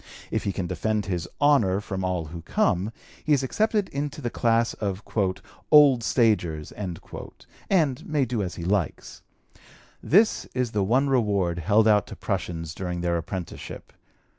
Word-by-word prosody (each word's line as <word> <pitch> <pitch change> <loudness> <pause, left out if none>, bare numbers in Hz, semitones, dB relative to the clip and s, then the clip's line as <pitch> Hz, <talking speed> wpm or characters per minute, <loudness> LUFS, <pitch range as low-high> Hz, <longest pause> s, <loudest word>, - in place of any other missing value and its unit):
If - - -1
he 100 - +1
can 95 -1 -3
defend 105 +4 -1
his 90 -2 -3
"honor" 125 -10 +4
from 95 -2 -4
all 90 -3 -1
who 85 +2 -8
come, 90 +5 0 0.3
he 155 - +2
is 135 -2 +2
accepted 210 - +1
into 145 +1 -4
the 120 -5 -3
class 115 0 +2
of 100 -1 -4 0.7
"old 145 -6 +7
stagers," 90 - +1
and 130 - -3
may 150 -3 +1
do 120 -3 -2
as 95 -2 -4
he 85 - -6
likes. 95 -4 -2 0.8
This 215 +6 +3
is 125 -3 0
the 105 -2 0
one 130 +8 +2
reward 100 -9 +1
held 105 +6 +3
out 105 -1 +4
to - - -8
prushuns 85 -4 -3
during 90 0 -4
their 85 0 0
apprenticeship. 85 +1 -7
105 Hz, 155 wpm, -25 LUFS, 90-130 Hz, 0.8 s, old